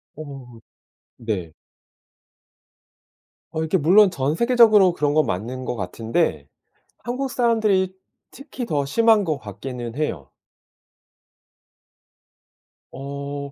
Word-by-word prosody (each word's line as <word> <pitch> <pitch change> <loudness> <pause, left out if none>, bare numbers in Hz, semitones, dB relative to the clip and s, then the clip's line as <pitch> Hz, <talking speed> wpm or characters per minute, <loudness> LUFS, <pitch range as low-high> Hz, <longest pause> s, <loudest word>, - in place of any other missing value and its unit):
어 135 -6 -10 0.6
네. 95 -9 -4 2.0
어 160 - -4
이렇게 160 +4 +1
물론 185 +5 +5
전 140 -2 -1
세계적으로 220 -5 +5
그런 145 -3 0
건 155 0 +3
맞는 125 +8 -4
거 125 - -3
같은데 110 - -2 0.5
한국 250 +3 -4
사람들이 215 -7 +1 0.4
특히 270 -3 -8
더 145 -8 0
심한 220 +7 +3
것 155 -5 -1
같기는 120 +3 -7
해요. 85 - -3 2.6
어 140 +1 -6
145 Hz, 180 characters per minute, -22 LUFS, 125-200 Hz, 2.6 s, 물론